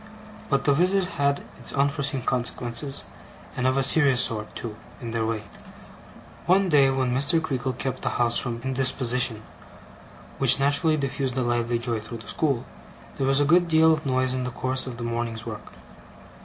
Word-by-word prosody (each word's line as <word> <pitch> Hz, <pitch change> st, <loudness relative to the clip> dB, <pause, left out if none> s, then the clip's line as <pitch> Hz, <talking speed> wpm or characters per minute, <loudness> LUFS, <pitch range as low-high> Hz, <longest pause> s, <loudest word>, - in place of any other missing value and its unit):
But 140 Hz, -1 st, +1 dB
the 145 Hz, -, +3 dB
visit 185 Hz, +6 st, +2 dB, 0.2 s
had 140 Hz, 0 st, +1 dB, 0.2 s
its -, -, 0 dB
unforeseen 140 Hz, -1 st, +1 dB
consequences; 125 Hz, +2 st, -2 dB, 0.5 s
and 125 Hz, 0 st, 0 dB
of 130 Hz, +1 st, +1 dB
a 135 Hz, -, +2 dB
serious 135 Hz, -2 st, +5 dB
sort, 110 Hz, -4 st, 0 dB
too, 110 Hz, -3 st, -5 dB, 0.2 s
in 120 Hz, -4 st, -6 dB
their 115 Hz, -1 st, -1 dB
way. 110 Hz, -2 st, -3 dB, 1.0 s
One 190 Hz, +1 st, +3 dB
day 140 Hz, -4 st, +5 dB
when 130 Hz, -2 st, 0 dB
Mr. 140 Hz, +5 st, +1 dB
Creakle 135 Hz, -5 st, -3 dB
kept 130 Hz, 0 st, -4 dB
the -, -, -1 dB
house 120 Hz, -1 st, 0 dB
from 120 Hz, -2 st, -3 dB
indisposition, 125 Hz, -3 st, +1 dB, 1.0 s
which -, -, +4 dB
naturally 145 Hz, +3 st, +2 dB
diffused 135 Hz, -2 st, -3 dB
a 130 Hz, -, +1 dB
lively 120 Hz, 0 st, 0 dB
joy 115 Hz, -1 st, -2 dB
through 115 Hz, +2 st, -8 dB
the 110 Hz, -2 st, -13 dB
school, 140 Hz, -3 st, -1 dB, 0.5 s
there 135 Hz, -, -1 dB
was 135 Hz, +1 st, +3 dB
a 145 Hz, -, +3 dB
good 175 Hz, +3 st, +4 dB
deal 160 Hz, 0 st, +5 dB
of 155 Hz, -2 st, -3 dB
noise 130 Hz, 0 st, +1 dB
in 130 Hz, 0 st, -2 dB
the 125 Hz, -, -3 dB
course 130 Hz, +2 st, -2 dB
of 120 Hz, -2 st, -6 dB
the 120 Hz, -, -6 dB
morning's 115 Hz, -1 st, -3 dB
work. -, -, -8 dB
130 Hz, 180 wpm, -25 LUFS, 120-140 Hz, 1.0 s, serious